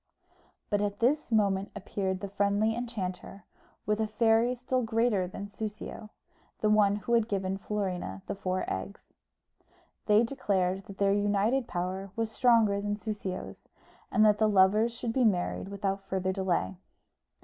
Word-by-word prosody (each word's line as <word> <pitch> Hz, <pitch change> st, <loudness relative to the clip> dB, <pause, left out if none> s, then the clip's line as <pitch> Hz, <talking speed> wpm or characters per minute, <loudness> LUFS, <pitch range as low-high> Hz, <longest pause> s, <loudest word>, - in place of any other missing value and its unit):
But 205 Hz, 0 st, +2 dB
at 205 Hz, -1 st, -1 dB
this 275 Hz, +4 st, +1 dB
moment 200 Hz, -3 st, +2 dB
appeared 190 Hz, -1 st, -3 dB
the 200 Hz, -, -3 dB
friendly 200 Hz, +2 st, +1 dB
enchanter, 200 Hz, -5 st, -5 dB, 0.4 s
with 210 Hz, +1 st, 0 dB
a 220 Hz, -, +1 dB
fairy 225 Hz, +3 st, +3 dB
still 255 Hz, +1 st, -1 dB
greater 225 Hz, -4 st, +1 dB
than 195 Hz, +2 st, -7 dB
Soussio, 210 Hz, 0 st, -7 dB, 0.5 s
the 215 Hz, -, +2 dB
one 205 Hz, -1 st, +4 dB
who 210 Hz, +3 st, -3 dB
had 230 Hz, -2 st, +3 dB
given 195 Hz, -2 st, -2 dB
Florina 185 Hz, -, -3 dB
the -, -, -3 dB
four 185 Hz, -2 st, -2 dB
eggs. 200 Hz, -, -6 dB, 0.9 s
They 210 Hz, +1 st, +5 dB
declared 195 Hz, -7 st, -1 dB
that 195 Hz, -, -11 dB
their 200 Hz, 0 st, +3 dB
united 205 Hz, +5 st, +1 dB
power 185 Hz, +2 st, -3 dB
was 225 Hz, -1 st, -2 dB
stronger 225 Hz, -5 st, +3 dB
than 205 Hz, 0 st, -1 dB
Soussio's, 205 Hz, -3 st, -6 dB, 0.4 s
and 215 Hz, -, +4 dB
that 210 Hz, -1 st, +4 dB
the 215 Hz, -1 st, +4 dB
lovers 205 Hz, +4 st, +4 dB
should 230 Hz, 0 st, -4 dB
be 260 Hz, -, +2 dB
married 195 Hz, -2 st, 0 dB
without 195 Hz, -1 st, -3 dB
further 190 Hz, -1 st, 0 dB
delay. 175 Hz, -, -1 dB
205 Hz, 150 wpm, -29 LUFS, 195-225 Hz, 0.9 s, They